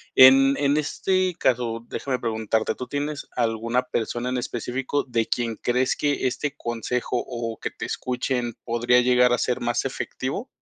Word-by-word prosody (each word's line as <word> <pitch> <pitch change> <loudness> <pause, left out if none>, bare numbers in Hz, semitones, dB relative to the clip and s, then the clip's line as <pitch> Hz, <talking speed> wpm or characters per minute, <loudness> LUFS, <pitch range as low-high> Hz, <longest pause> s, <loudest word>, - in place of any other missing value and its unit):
En, 135 +1 +8
en 140 0 +2
este 185 +5 0
caso, 115 -2 0
déjame 130 -2 -3
preguntarte, 110 -1 -1
¿tú 125 - -6
tienes 145 +1 -3
alguna 115 +1 0
persona 120 0 -2
en 125 - -1
específico 125 +4 -2
de 115 -3 0
quien 115 -2 -1
crees 125 +3 +1
que 145 -3 0
este 135 +3 -2
consejo 120 +1 -2
o 115 -2 -4
que - - -4
te - - -6
escuchen 125 -1 -2
podría 120 +1 +3
llegar 125 0 +4
a 120 - +3
ser 125 +1 -1
más 120 +2 0
efectivo? 135 - -4
125 Hz, 160 wpm, -24 LUFS, 120-135 Hz, -, En